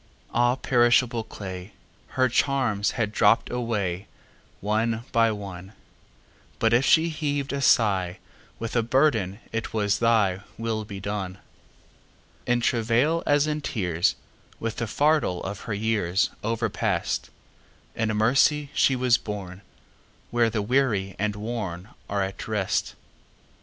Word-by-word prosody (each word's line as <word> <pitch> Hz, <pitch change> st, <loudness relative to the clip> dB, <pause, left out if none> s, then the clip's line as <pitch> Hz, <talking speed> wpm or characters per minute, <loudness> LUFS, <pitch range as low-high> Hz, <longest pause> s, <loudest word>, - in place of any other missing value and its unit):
Ah, 120 Hz, +1 st, +3 dB
perishable 120 Hz, -2 st, +3 dB
clay! 95 Hz, -2 st, -8 dB, 0.4 s
Her 130 Hz, 0 st, +4 dB
charms 120 Hz, -5 st, +1 dB
had 110 Hz, -3 st, -1 dB
dropp'd 115 Hz, +2 st, +3 dB
awayOne 105 Hz, -6 st, -2 dB, 1.0 s
by 115 Hz, -1 st, +4 dB
one; 100 Hz, -2 st, -7 dB, 0.8 s
But 115 Hz, 0 st, +2 dB
if 120 Hz, +3 st, +4 dB
she 165 Hz, +4 st, +4 dB
heav'd 145 Hz, -2 st, -2 dB
a 140 Hz, -, -1 dB
sighWith 105 Hz, -1 st, 0 dB
a 120 Hz, -, +4 dB
burden, 115 Hz, -6 st, +2 dB
it 115 Hz, 0 st, -4 dB
was, 105 Hz, -1 st, +1 dB
"ThyWill 110 Hz, 0 st, 0 dB
be 100 Hz, -2 st, -7 dB
done."In 100 Hz, +4 st, -6 dB
travail, 120 Hz, +8 st, +2 dB
as 145 Hz, 0 st, +4 dB
in 150 Hz, 0 st, -2 dB
tears, 90 Hz, -, 0 dB, 0.4 s
With 115 Hz, -1 st, -3 dB
the 115 Hz, -, -2 dB
fardel 145 Hz, -, +1 dB
of 100 Hz, +1 st, -5 dB
her 105 Hz, -, -1 dB
yearsOverpast, 110 Hz, 0 st, -1 dB, 0.7 s
In 110 Hz, -1 st, 0 dB
mercy 140 Hz, +6 st, +3 dB
she 135 Hz, -, +3 dB
was 125 Hz, -1 st, +3 dB
borneWhere 100 Hz, -, -5 dB
the 105 Hz, -2 st, -1 dB
weary 105 Hz, -6 st, +1 dB
and 105 Hz, 0 st, 0 dB
wornAre 105 Hz, -3 st, -5 dB, 0.3 s
at 95 Hz, -, -8 dB
rest. 105 Hz, -3 st, -1 dB
110 Hz, 110 wpm, -25 LUFS, 100-120 Hz, 1.0 s, Her